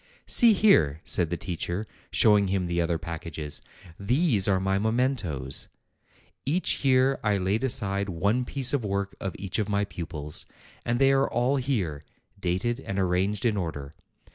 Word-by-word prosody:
"See 235 -2 +6
here," 80 - +4
said 85 -3 +2
the 85 - -2
teacher, 90 +4 -3 0.2
showing 105 -2 +4
him 95 -1 0
the 85 0 0
other 85 0 0
packages; 80 -3 -5 0.4
"these 120 - +2
are 95 -2 +3
my 95 +1 0
mementoes. 110 - -1 0.8
Each 160 +4 0
year 135 0 +3
I 105 -1 +2
laid 100 +6 0
aside 100 -6 0
one 100 +8 0
piece 130 +1 0
of 140 -5 +1
work 100 -1 -2
of 95 - -4
each 100 +2 -3
of 105 -1 -1
my 100 0 +1
pupils; 80 -5 -6 0.4
and 120 0 0
they 135 +2 +4
are 135 0 +2
all 125 +4 +1
here, 100 - -2 0.4
dated 95 +7 -1
and 100 -7 -5
arranged 95 +3 0
in 115 -3 +2
order. 80 -6 -4
100 Hz, 160 wpm, -26 LUFS, 85-120 Hz, 0.8 s, See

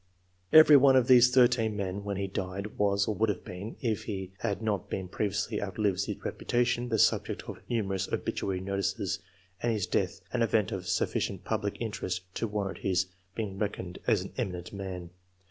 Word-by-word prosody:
' 90 0 -40
Every 155 -2 +9
one 135 0 +6
of 130 -2 +4
these 125 -1 +8
13 120 -4 +4
men 100 0 -3
when 100 -1 -3
he 100 0 -1
diec 95 +2 -4
was, 100 -1 +2
or 110 - +1
would 110 +1 +1
have 100 - -3
been, 95 +5 -7
if 110 -3 -1
he 95 -3 -4
had 100 - -1
not 110 -3 -2
pr< - - -1
viously 95 +1 -2
outlived 100 -1 0
his - - -5
reputation, 120 0 0
the 115 - +1
subject - - +2 0.2
< - - -28
numerous 100 -5 -1
obituary 95 -2 -2
notices, 100 0 -1 0.4
and 120 - +1
his 105 -4 0
death - - -1
a 125 - 0
CA^ent 110 -3 +2
of 90 -2 -4
sufficient - - -1
public - - -2
interest 90 0 -3
to 115 - -2
warrant 105 -2 -3
h 95 -2 +1 0.4
being 100 -4 -4
reckoned 95 -4 -3
as - - +3
an - - -7
'^eminent 90 -1 -4
man.'' 95 -3 -6
100 Hz, 185 wpm, -29 LUFS, 95-115 Hz, 0.4 s, Every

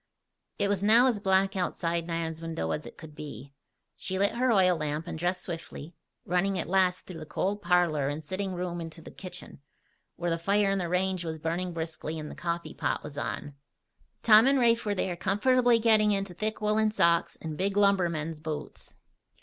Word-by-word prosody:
It 200 - +1
was 200 -2 0
now 225 +5 +6
as 240 -5 +2
black 195 0 +2
outside 170 -2 -1
Nan's 165 -1 -3
window 160 - -3
as 150 - -3
it - - -12
could 160 -2 -11
be. 140 -3 -9 0.4
She 190 - -4
lit 200 +1 +2
her 245 +2 +1
oil 185 -4 +4
lamp 155 0 -3
and - - -5
dressed 175 +3 -1
swiftly, 165 -2 -7 0.3
running 185 +2 +1
at - - -3
last 185 -1 +2
through 175 -3 -8
the 155 - -7
cold 205 +5 -2
parlor 175 -6 +2
and 150 +2 -5
sitting 190 +2 -3
room 175 -1 -3
into 165 0 -8
the - - -10
kitchen, 185 -6 -10 0.5
where 175 0 -2
the 165 - 0
fire 200 +3 +2
in 195 - 0
the 175 -2 -2
range 185 0 0
was 160 -1 -4
burning 170 +3 -2
briskly 160 -1 -4
and 155 -1 -6
the - - -9
coffee 170 -1 -3
pot - - -2
was 150 -1 -8
on. 145 0 -4 0.7
Tom 220 +2 +7
and 275 0 +4
Rafe 235 -3 +3
were 205 - +1
there 185 -1 -1
comfortably 240 +7 +3
getting 220 -2 +4
into 195 -2 -1
thick 215 +4 -3
woolen 215 +1 +2
socks 170 -5 +2
and 160 -1 -5
big 195 +4 -1
lumbermen's 170 -6 +2
boots. 155 -1 -7
180 Hz, 195 wpm, -28 LUFS, 165-200 Hz, 0.7 s, Tom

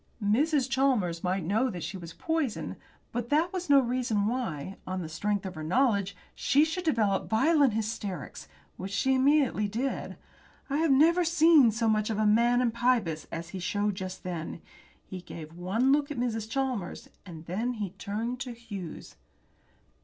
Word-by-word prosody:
Mrs. 265 +6 +2
Chalmers 255 -11 +1
might 185 0 0
know 220 +10 +1
that 180 -7 -6
she 175 +4 -5
was 170 -3 -8
poisoned, 320 - -2 0.4
but 240 0 -3
that 320 +5 +2
was 365 -3 -4
no 280 -1 +7
reason 240 -5 0
why, 195 - -3
on 185 -1 -3
the - - -5
strength 200 +5 -2
of 190 - -5
her 155 - -7
knowledge, 200 - +1 0.2
she 290 +3 +3
should 330 +3 -3
develope 215 -10 +1
violent 280 +2 +4
hysterics, 215 -3 -4 0.3
which 190 - -5
she 265 +6 +2
immediately 265 -5 +3
did. 240 +6 -3 0.5
I 280 - +1
had 320 -1 +2
never 330 +6 +5
seen 320 -5 +6
so 225 +1 0
much 215 0 +2
of 220 - -1
the 215 - +2
man 235 +3 +4
in 245 -2 +2
Pybus 235 -10 0
as 165 0 -5
he 190 - -6
showed 205 +3 0
just 185 -1 -6
then. 170 -2 -5 0.4
He 185 -1 -7
gave 160 -2 -9
one 195 +10 +1
look 290 +1 +2
at 295 - -5
Mrs. 225 -3 -2
Chalmers, 255 -7 -3 0.2
and 165 -4 -10
then 220 +9 -2
he 210 -6 -4
turned 220 +6 -4
to 250 -2 -5
Hughes. 205 -8 -8
225 Hz, 175 wpm, -28 LUFS, 190-265 Hz, 0.5 s, no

